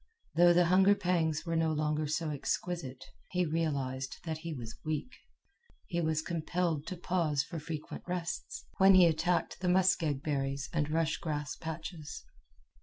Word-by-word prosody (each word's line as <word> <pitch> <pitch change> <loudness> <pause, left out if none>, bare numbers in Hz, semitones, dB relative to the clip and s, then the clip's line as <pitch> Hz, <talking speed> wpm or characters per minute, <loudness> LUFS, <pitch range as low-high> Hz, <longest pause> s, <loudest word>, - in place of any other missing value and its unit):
Though 175 +1 +6
the 175 0 +5
hunger 190 +3 +5
pangs 160 -5 0
were 165 -1 -1
no 165 -1 +2
longer 155 0 0
so 155 +1 -1
exquisite, 145 -2 -3 0.2
he 180 -1 +1
realized 140 -5 -1
that 160 -2 -3
he 165 +1 -5
was 120 -7 -7
weak. 155 - -3 0.7
He 170 -2 -2
was 155 -1 0
compelled 165 -2 -1
to 185 - -4
pause 170 -5 0
for 165 +2 -6
frequent 155 0 -6
rests, 180 - -4
when 190 0 +8
he 185 -1 +8
attacked 170 +2 +1
the 180 -1 0
muskeg 175 -6 +2
berries 140 -3 -1
and 150 -3 0
rush 160 0 +1
grass 150 -2 -3
patches. 160 -1 -7
160 Hz, 155 wpm, -32 LUFS, 150-175 Hz, 0.7 s, when